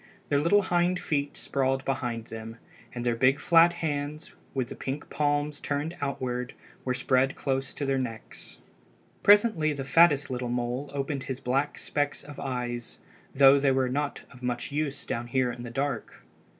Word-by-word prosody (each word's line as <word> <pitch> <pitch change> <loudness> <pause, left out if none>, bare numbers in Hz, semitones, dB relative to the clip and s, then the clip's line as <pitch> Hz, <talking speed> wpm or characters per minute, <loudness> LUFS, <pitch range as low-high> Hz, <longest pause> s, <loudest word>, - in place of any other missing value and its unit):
Their 145 - +3
little 195 +7 +4
hind 180 0 +1
feet 145 -2 -2
sprawled 135 -1 0
behind 120 -4 -2
them, 115 0 -8 0.3
and 120 -1 -5
their 120 -1 +2
big 130 +4 +3
flat 170 +2 +6
hands, 150 -1 -3 0.2
with 130 -2 -1
the - - -7
pink 135 +3 -5
palms 145 0 0
turned 150 +4 -2
outward, 125 -3 -3 0.3
were 125 -1 -1
spread 130 +1 +2
close 135 -1 -1
to 145 - -2
their 135 -1 +1
necks. 115 -4 -6 0.6
Presently 205 -7 +5
the 140 -2 -4
fattest 145 -1 +4
little 125 -1 -2
mole 125 +3 -2
opened 140 -1 -3
his 130 -1 -4
black 135 +3 0
specks 145 -1 -2
of 145 0 -10
eyes, 120 -3 -4 0.4
though 135 +1 +7
they 135 -1 +3
were 130 -1 +2
not 145 +2 -2
of 125 - -15
much 125 +2 -3
use 145 -1 -2
down 120 +1 -3
there 130 -1 +2
in 120 - -8
the 120 - -6
dark. 135 -1 -3
135 Hz, 170 wpm, -28 LUFS, 125-145 Hz, 0.6 s, though